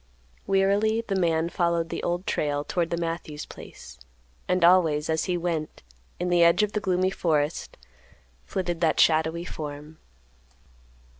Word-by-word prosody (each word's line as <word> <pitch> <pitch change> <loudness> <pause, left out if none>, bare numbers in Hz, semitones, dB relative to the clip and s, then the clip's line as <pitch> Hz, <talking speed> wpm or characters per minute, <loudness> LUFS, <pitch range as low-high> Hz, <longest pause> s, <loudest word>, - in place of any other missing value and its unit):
Wearily 200 +3 +2
the 205 -4 -3
man 165 -3 +1
followed 170 -2 0
the - - -4
Old 175 +2 -2
Trail 145 -1 -1
toward 170 +1 -1
the 170 - -2
Matthews 165 -3 -4
place, 65 0 -12 0.5
and 180 -1 +1
always, 160 -4 +4
as 160 - 0
he 180 -1 -1
went, 165 - -3 0.4
in 180 0 -1
the 175 -1 +4
edge 170 +5 +5
of 210 - 0
the 210 - -1
gloomy 185 -1 +1
forest, 155 -4 -1 0.7
flitted 175 -3 -3
that 160 -2 +2
shadowy 160 +1 +3
form. 150 -1 -8
170 Hz, 145 wpm, -26 LUFS, 160-180 Hz, 0.7 s, edge